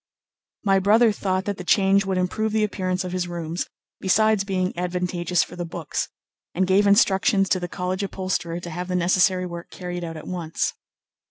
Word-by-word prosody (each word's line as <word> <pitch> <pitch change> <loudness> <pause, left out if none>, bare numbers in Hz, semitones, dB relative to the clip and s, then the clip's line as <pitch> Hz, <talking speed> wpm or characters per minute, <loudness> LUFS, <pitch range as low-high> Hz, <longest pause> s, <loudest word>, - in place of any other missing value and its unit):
My 195 -2 +4
brother 215 +4 +5
thought 190 -2 -1
that 205 -1 -2
the 180 - -6
change 195 +1 +3
would 190 -1 0
improve 215 +4 -1
the 220 -1 +2
appearance 185 -3 -1
of 180 - -5
his 180 -1 -2
rooms, 170 0 -4 0.3
besides 215 +2 +3
being 185 -2 -1
advantageous 180 -1 0
for 175 - -10
the 175 - -4
books, 165 -2 -4 0.5
and 190 +2 +2
gave 195 +2 +4
instructions 195 0 +4
to 185 - +2
the 175 - -3
college 180 +2 -3
upholsterer 185 -3 -2
to 175 - -7
have 180 +2 -4
the 180 - -2
necessary 185 +1 +3
work 170 -1 -7
carried 175 -1 -6
out 165 -1 -5
at 155 - -9
once. 170 -3 -2
185 Hz, 185 wpm, -24 LUFS, 175-195 Hz, 0.5 s, brother